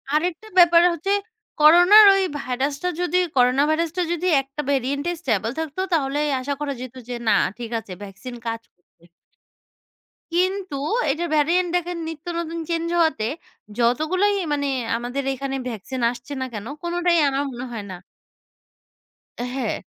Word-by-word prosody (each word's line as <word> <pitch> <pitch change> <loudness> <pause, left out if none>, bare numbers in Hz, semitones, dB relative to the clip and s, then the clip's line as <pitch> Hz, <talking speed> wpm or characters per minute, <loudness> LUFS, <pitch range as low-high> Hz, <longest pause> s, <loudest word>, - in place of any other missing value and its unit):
আরেকটা 350 +6 -1
ব্যাপার 345 -1 +7
হচ্ছে, 340 +5 -3 0.5
করোনা 350 +7 +8 0.2
ওই 390 - +2 0.2
ভাইরাসটা 275 +6 -2
যদি, 355 0 +1 0.2
করোনা 250 +2 +4
ভাইরাসটা 335 +2 0
যদি 345 +1 -1
একটা 275 +2 -7
ভেরিয়েন্ট 280 +2 -1
এ - - -2
স্টেবল 225 -2 0
থাকত, 320 -1 -5 0.2
তাহলে 285 -2 +1 0.2
আশা 285 +2 -2
করা 290 -1 -2
যেত 255 0 -8
যে 245 - -3
না - - +5 0.2
ঠিক 235 -1 -6
আছে, 200 -4 -10
ভ্যাকসিন 205 +6 -9
কাজ 230 0 -3
করবে। 175 -1 -29 1.3
কিন্তু 370 -1 0 0.4
এটা 325 +5 -2
ভেরিয়ান্ট 345 +4 +2
দেখেন 355 0 -1
নিত্য 320 0 -8
নতুন 335 0 -4
চেঞ্জ 335 0 -1
হওয়াতে, 320 -10 +2 0.5
যতগুলোই 315 +12 +2 0.2
মানে 285 -1 -1 0.3
আমাদের 245 +4 -4
এখানে 270 +1 -4
ভ্যাকসিন 245 +3 -5
আসছে 245 +4 -9
না - - -1
কেন 210 -1 -6 0.2
কোনটাই 345 0 +1
আমার 275 +1 -1
মনে 245 0 -6
হয় 220 -4 -6
না - - -6 1.5
হ্যাঁ। 250 +2 -3
285 Hz, 145 wpm, -22 LUFS, 250-340 Hz, 1.5 s, করোনা